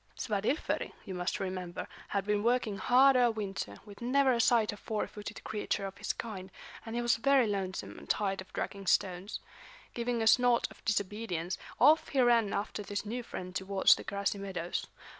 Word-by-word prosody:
Svadilföri, 215 - -1
you 190 - -5
must 180 -1 -2
remember, 185 -2 -4 0.2
had 200 -1 -1
been 210 0 +1
working 230 -3 +1
hard 265 +2 +6
all 245 -2 +5
winter, 195 - -4
with 205 +1 -13
never 265 +2 +3
a 235 - +2
sight 225 -2 +3
of 205 - -11
four 215 0 -2
footed 210 +1 -8
creature 210 -1 -2
of 195 0 -7
his 205 - -1
kind, 195 -5 -6 0.3
and 225 0 -6
he 240 - 0
was 240 0 +3
very 275 +1 +4
lonesome 195 -3 -3
and - - -14
tired 195 -2 0
of 190 - -13
dragging 195 -1 -4
stones. 185 +3 +1 0.5
Giving 235 -1 -1
a - - 0
snort 245 +1 +5
of - - -16
disobedience, 200 -4 -1 0.2
off 305 +5 +6
he 275 - -1
ran 235 -4 +4
after 210 +1 -2
this 205 +1 -4
new 240 +4 -3
friend 185 -5 -7
towards 190 +1 +4
the - - -4
grassy 200 0 -2
meadows. 180 -3 -3
210 Hz, 185 wpm, -31 LUFS, 195-235 Hz, 0.5 s, hard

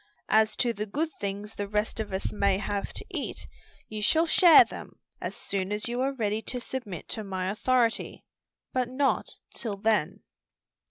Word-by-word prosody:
"As 220 0 +4
to 240 -2 +1
the 210 0 -4
good 310 +10 -1
things 205 +1 -4
the 205 - -4
rest 210 +2 -1
of 215 -2 -3
us 190 +1 -2
may 200 -2 +2
have 200 0 -3
to - - -4
eat, - - -4 0.4
you 215 -1 -5
shall 320 +10 +4
share 335 0 +8
them - - -10 0.2
as - - -4
soon 195 0 -2
as 210 +2 -1
you 240 +1 -2
are 270 +1 +1
ready 215 -3 -1
to 250 +2 -3
submit 235 -8 -6
to 220 - -2
my 190 -1 -2
authority, 235 +2 +1 0.5
but 255 -1 0
not 270 +2 +1 0.2
till 215 -5 -3
then." 215 +1 +1
215 Hz, 175 wpm, -28 LUFS, 200-245 Hz, 0.5 s, share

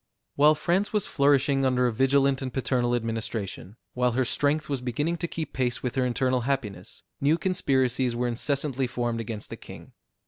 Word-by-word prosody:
While 150 +2 +5
France 180 +6 0
was 210 -3 0
flourishing 140 -1 +2
under 125 -1 +2
a 120 - +1
vigilant 135 +2 +2
and 130 -1 -3
paternal 125 -2 0
administration, 110 -4 -4 0.2
while 125 -1 +1
her 130 +1 +1
strength 145 +5 +1
was 140 -3 -2
beginning 145 +8 -1
to 170 - -3
keep 165 -1 -5
pace 125 -2 -1
with 125 - -2
her 130 -1 +1
internal 125 +1 +1
happiness, 115 -8 -4 0.2
new 150 +4 +3
conspiracies 130 -8 +1
were 120 +1 0
incessantly 135 +2 -1
formed 120 -1 -2
against 110 -1 -5
the - - -5
king. - - -12
130 Hz, 175 wpm, -26 LUFS, 120-140 Hz, 0.2 s, While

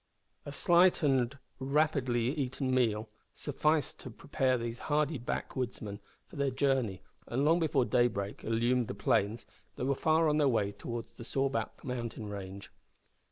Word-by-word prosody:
A - - -4
slight 175 +4 +4
and 135 -2 +2 0.2
rapidly 135 -3 +1
eaten 135 -2 -1
meal 110 -4 +2 0.3
sufficed 150 +1 0
to - - -8
prepare 130 +1 0
these 115 0 -4
hardy 150 -1 +1
backwoodsmen 115 -4 -4 0.3
for 175 - -13
their 140 -1 +1
journey, 130 -8 0 0.2
and, 130 +4 0
long 165 +3 +4
before 145 -6 +2
daybreak 120 -6 0
illumined 120 +2 +1
the - - -5
plains, 105 +3 +1 0.3
they - - -4
were 135 +2 +2
far 160 +3 +3
on 150 0 +2
their 145 -3 +4
way 105 -5 +1
towards 115 +3 -6
the - - -10
Sawback 135 +2 -2
mountain 120 -4 -4
range. 100 -1 -7
130 Hz, 150 wpm, -31 LUFS, 115-145 Hz, 0.3 s, slight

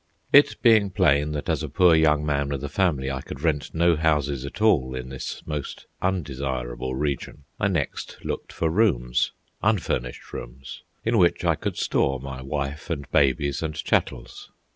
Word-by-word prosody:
It 145 +1 +6
being 110 -4 +5
plain 75 -6 +2
that 75 - -4
as - - 0
a - - -4
poor 90 -2 +5
young 75 -2 +3
man 70 -1 0
with 70 -1 -3
a 75 - -3
family 70 -5 0
I 65 -1 -3
could 65 - -9
rent 75 -2 -1
no 85 +1 +4
houses 75 -4 0
at - - -9
all 70 -13 +3
in 65 0 -6
this 65 -1 -6
most 75 -3 -5 0.2
undesirable 65 -8 -2
region, 70 0 -3 0.2
I 100 - +2
next 85 -7 -3
looked - - -4
for 80 -1 -1
rooms, 80 - +2 0.3
unfurnished 80 - -1
rooms, 65 +2 -8 0.2
in 115 -1 +2
which 85 -2 +3
I - - +4
could - - -4
store 70 -1 +1
my 65 0 -7
wife 70 +4 -4
and 70 -5 -3
babies 70 0 +2
and 80 -2 -3
chattels. - - -2
75 Hz, 170 wpm, -25 LUFS, 65-85 Hz, 0.3 s, It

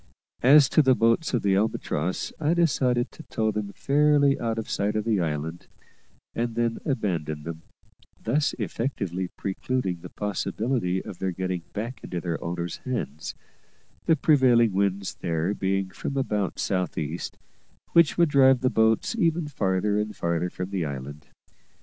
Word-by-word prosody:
As 140 +2 +7
to 155 - +5
the 130 -3 +4
boats 115 +9 +2
of 120 - -1
the 100 -1 +3
Albatross, 95 -4 -1
I 160 +2 +2
decided 130 -7 +2
to - - -12
tow 110 -1 -1
them 105 -1 -3
fairly 145 -1 +3
out 115 -1 -1
of 110 - -3
sight 105 +1 -1
of 110 0 -1
the 110 -4 +2
island, 80 0 -3 0.7
and 115 0 -2
then 115 -1 0
abandon 85 - -2
them; 80 0 -6 0.6
thus 140 +6 0
effectually 100 -4 -2
precluding 95 -2 -2
the 90 - -9
possibility 105 -1 -2
of 90 - -8
their 95 - -1
getting 90 0 -3
back 115 +3 -5
into 90 - -4
their 85 -2 -3
owners' 85 0 -3
hands, 80 - -4 0.7
the 165 - +5
prevailing 125 -8 +4
winds 100 0 0
there 85 +2 -1
being 95 -1 -1
from 140 - -4
about 105 -7 -1
south 90 -3 -1
east, 80 +3 -4 0.5
which 170 -3 +4
would 170 -2 +4
drive 135 -2 +5
the 130 - +2
boats 110 - +2
ever 165 0 +2
farther 100 -4 0
and 105 0 -3
farther 85 +1 -1
from 90 +2 -6
the 95 -3 -1
island. 70 +1 -6
105 Hz, 155 wpm, -26 LUFS, 90-130 Hz, 0.7 s, As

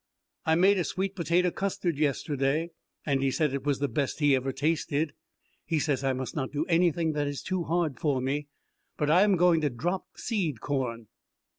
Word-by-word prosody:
I 160 - +4
made 190 +3 +4
a - - +1
sweet 190 +3 -2
potato 175 +1 +2
custard 180 -5 -2
yesterday, 145 +2 0 0.3
and 140 -2 +1
he 135 - +2
said 150 +1 0
it 140 -1 -3
was 140 -2 +2
the 145 - 0
best 140 +4 -2
he 145 -2 +4
ever 130 +1 -1
tasted. 150 +1 0 0.5
He 160 0 -1
says 145 -3 0
I 135 - +2
must 130 -2 -4
not 135 -4 -2
do 150 +2 -1
anything 170 -2 +2
that 145 -1 -1
is 145 -1 -4
too 185 -3 -2
hard 165 -6 0
for 145 -4 +1
me, 140 +3 -2 0.5
but 150 0 +1
I 175 +4 +6
am 205 -1 +4
going 170 -2 +4
to 150 - +1
drop 175 +10 -3
seed 175 - -2
corn. 125 -5 -2
150 Hz, 195 wpm, -28 LUFS, 135-170 Hz, 0.5 s, I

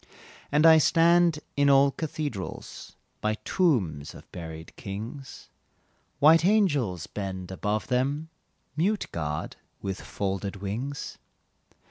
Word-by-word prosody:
And 150 +2 +4
I 160 -1 +9
stand 170 +1 +4 0.2
in 140 0 +3
old 140 0 +5
cathedrals, 145 - -5 0.3
By 110 0 +1
tombs 95 - +1
of - - -14
buried 80 -2 -8
kings, 110 +8 -8 0.7
White 155 +3 +6
angels 145 - +2
bend 95 -2 -5
above 105 +3 -2
them 140 +5 -1 0.5
Mute 200 +7 +1
guard 75 -2 -4 0.2
with 95 -1 -4
folded 100 0 -3
wings. 115 +9 -5
130 Hz, 105 wpm, -27 LUFS, 95-155 Hz, 0.7 s, I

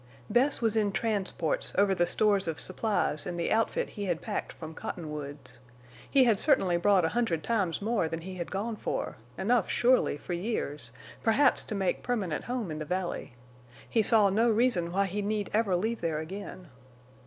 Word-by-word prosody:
Bess 250 +3 +2
was 225 -1 +2
in 210 -2 +2
transports 220 - 0
over 200 -1 +4
the 175 -2 +1
stores 205 -3 +2
of 160 -2 -2
supplies 185 -6 +1
and 175 -1 -4
the 170 - -1
outfit 225 0 +1
he 205 - -5
had 175 -4 -1
packed - - -4
from 160 -1 -9
Cottonwoods. 150 -5 -6 0.5
He 275 -2 +5
had 225 -5 +3
certainly 230 - +3
brought 185 0 +3
a - - +1
hundred 210 -9 0
times 200 -6 0
more 220 -6 +1
than 165 +1 -4
he 185 +3 -7
had 175 -2 -5
gone 215 +3 -3
for; - - -3 0.2
enough, 225 +1 +1
surely, 245 - +3
for 175 - -6
years, 150 - -3 0.3
perhaps 260 +5 +3
to 215 - -4
make 190 -2 0
permanent 200 -11 -2
home 240 -8 -3
in 155 - -5
the - - -3
valley. 180 -6 -3 0.5
He 225 - +2
saw 210 -2 +5
no 225 +4 +3
reason 215 -7 +2
why 200 +2 +2
he 200 +2 -3
need 205 0 -2
ever 210 -4 +2
leave 220 +6 -1
there 165 -2 -1
again. 185 +1 -7
200 Hz, 185 wpm, -29 LUFS, 170-225 Hz, 0.5 s, He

